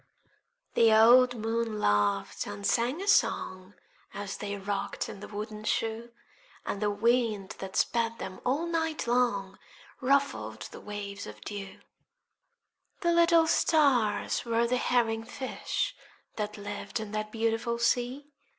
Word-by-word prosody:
The 230 -1 +5
old 245 +3 +7
moon 225 0 -2
laughed 105 - +1
and 205 0 -6
sang 250 - +1
a - - -7
song, 185 - +1 0.4
As 200 -1 -5
they 205 -1 -4
rocked 200 0 -3
in - - -8
the - - -8
wooden 215 +1 -6
shoe; 225 +2 -1 0.5
And 200 - -3
the 210 - +2
wind 215 -1 +1
that 190 -1 -7
sped 230 -1 +1
them 190 -4 -7
all 280 +7 0
night 325 -2 -1
long 235 -6 0 0.4
Ruffled 275 +2 0
the - - -10
waves 200 -1 -6
of 105 0 -10
dew; 195 - -7 1.2
The 345 -2 +2
little 335 -1 +5
stars 275 -10 +2
were 235 0 +1
the 250 +2 +1
herring 230 -3 +1
fish 255 +3 -3 0.4
That 210 0 -4
lived 205 +2 -5
in 215 -2 -6
the 215 0 -2
beautiful 230 +1 0
sea. 250 +4 0
225 Hz, 135 wpm, -29 LUFS, 205-250 Hz, 1.2 s, old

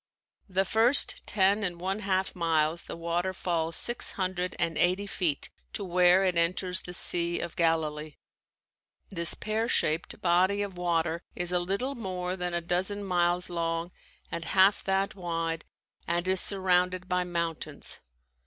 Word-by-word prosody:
The 190 +1 +1
first 230 +7 +2
ten 200 +1 +3
and 175 -4 -2
one 190 +3 -2
half 190 -2 -1
miles 165 -1 +1
the - - -7
water 170 +2 -2
falls 165 -2 -1
six 240 0 +4
hundred 185 -1 -2
and 165 - -1
eighty 185 +5 +1
feet 170 -7 -1 0.2
to 205 - -3
where 180 +1 +4
it 180 -2 +1
enters 180 +2 +1
the 180 - -9
Sea 175 -1 +2
of 170 - -5
Galilee. 155 -2 0 0.9
This 170 -3 0
pear 220 +2 -2
shaped 155 +3 0
body 185 +3 +2
of 200 -2 -6
water 170 -1 -1
is 175 0 -3
a 180 - +2
little 200 +10 -2
more 185 -6 -4
than 180 -1 -3
a 170 - -1
dozen 185 +4 -1
miles 175 -1 +1
long 165 0 -2 0.4
and 170 0 -4
half 190 +3 +3
that 195 +1 0
wide 165 -3 -3 0.4
and 175 +1 -1
is 185 0 +5
surrounded 185 -1 +2
by 180 0 0
mountains. 170 -2 -3
180 Hz, 155 wpm, -28 LUFS, 170-190 Hz, 0.9 s, is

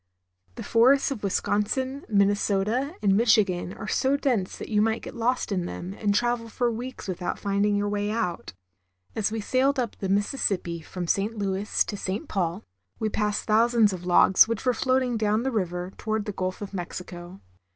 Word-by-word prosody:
The - - -6
forests 260 +5 +4
of 250 -6 -4
Wisconsin, 255 +7 -1
Minnesota, 205 - +1
and 195 -1 +4
Michigan 205 -5 +3
are 215 - -8
so 270 +5 +1
dense 240 -10 -1
that - - -7
you 210 -2 +2
might 220 +1 0
get - - -7
lost 245 0 -1
in 180 -3 -1
them 180 +2 -6
and 205 0 0
travel 240 0 0
for 240 +1 0
weeks 245 +1 -6
without 180 -1 -3
finding 200 +1 +1
your 205 0 0
way 205 0 -1
out. 210 -6 -2 0.6
As 215 -1 0
we 225 - -2
sailed 265 +6 +1
up 245 -4 -2
the 195 - -4
Mississippi 195 -5 0
from 180 +2 -6
St. 205 +6 0
Louis 200 0 0
to - - -5
St. 200 +9 -4
Paul, 180 -1 -2 0.3
we 220 - -1
passed 210 0 -1
thousands 225 -1 +4
of 180 -1 -6
logs 185 +3 +6
which 230 +1 -3
were 250 - +3
floating 255 0 +1
down 215 +1 +1
the 265 - -1
river 180 -4 -2
toward 220 -1 -2
the 210 - -3
Gulf 185 0 -4
of 200 - -8
Mexico. 175 0 -7
210 Hz, 185 wpm, -26 LUFS, 195-235 Hz, 0.6 s, logs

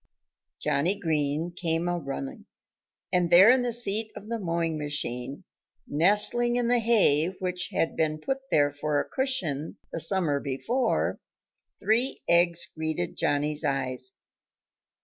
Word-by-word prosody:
Johnnie 150 +7 0
Green 155 0 -1
came 165 0 -1
a 175 0 -1
running. 135 -2 -7 0.7
And 180 -1 +2
there 185 +6 +8
in 255 0 +3
the 245 -1 -1
seat 220 -2 +1
of 210 - -10
the 230 -1 -2
mowing 165 -3 -1
machine, 140 -1 -4 0.4
nestling 210 +9 +3
in 245 -1 0
the 245 0 +3
hay 205 -10 +3
which 180 0 -3
had 165 - -1
been 155 -1 0
put 270 - -3
there 145 -1 +3
for 145 +1 -1
a - - -3
cushion 170 - -2
the - - -4
summer 165 -5 +2
before, 225 - -1 0.6
three 235 +5 +1
eggs 170 0 +3
greeted 155 - -3
Johnnie's 150 +1 0
eyes. 130 -3 -2
170 Hz, 135 wpm, -27 LUFS, 145-205 Hz, 0.7 s, there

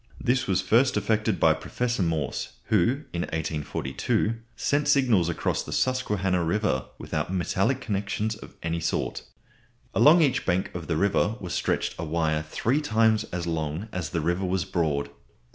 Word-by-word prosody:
This 125 +1 +1
was 95 -1 +1
first 115 +6 +3
effected 105 +1 +1
by - - +5
Professor 120 -3 -2
Morse, 80 -5 -1 0.2
who, 115 - +2
in 85 - -1
1842, 80 +4 -1 0.2
sent 145 +5 0
signals 125 - +4
across 85 - -1
the - - -8
Susquehanna 100 -8 +1
River 85 -6 0
without - - -3
metallic 95 +7 0
connections 105 0 -2
of 110 - -13
any 85 0 -1
sort. 85 - -2 0.7
Along 160 +3 +6
each 135 -3 +1
bank 90 +1 0
of 85 -2 -6
the 80 - 0
river 100 +3 +2
was 90 -2 -5
stretched - - 0
a - - -2
wire 80 -1 0
three 115 - 0
times 110 -5 +2
as 85 -1 -4
long 80 +4 -3
as 90 -5 -3
the 80 - -1
river 85 +4 0
was 95 -1 0
broad. 80 -7 -1
95 Hz, 160 wpm, -26 LUFS, 85-110 Hz, 0.7 s, Along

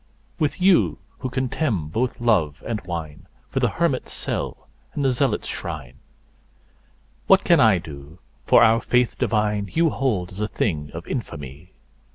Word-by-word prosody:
With 150 0 0
you, 185 -1 +4 0.2
who 130 - -3
contemn 125 - -1
both 120 +9 -1
love 90 -12 +1
and 110 -3 -3
wine2 80 -4 -6 0.2
for - - -2
the - - +2
hermit's - - -1
cell - - -4 0.3
and 140 - -1
the 135 - +4
zealot's 125 -3 0
shrine, 75 -8 -6 1.3
What 195 0 +6
can 170 -2 +5
I 110 -4 +6
do, 75 -1 -10 0.3
for - - +6
our 115 0 +5
Faith 125 0 +1
divine 105 -2 0
you 165 -1 +2
hold 105 -10 -1
as 95 - -10
a 105 - 0
thing 75 -10 -2
of - - -6
infamy? 70 +6 -6
105 Hz, 155 wpm, -23 LUFS, 80-130 Hz, 1.3 s, What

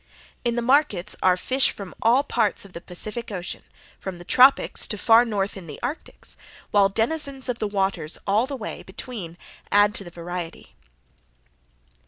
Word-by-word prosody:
In 240 -1 0
the 240 - -1
markets 240 - +2
are 185 -1 +4
fish 260 +7 +2
from 195 -3 -7
all 240 +5 +4
parts 225 -8 0
of 195 - -15
the 170 - -7
Pacific 215 +7 -3
Ocean, 180 -3 -5 0.4
from 190 -2 -6
the 175 - -10
Tropics 260 +8 +5
to 210 - -2
far 230 +4 +6
north 205 -3 -1
in 185 -4 -9
the - - -8
Arctics, 270 +6 -4 0.3
while 200 -1 +5
denizens 270 +5 0
of 245 -2 -2
the 215 - 0
waters 190 -6 -1
all 210 +5 +2
the 275 -1 -4
way, 220 - -6
between 190 -4 -7 0.3
add 205 +1 +5
to 200 - -2
the 175 - -9
variety. 175 0 -7
210 Hz, 170 wpm, -24 LUFS, 185-245 Hz, 0.4 s, far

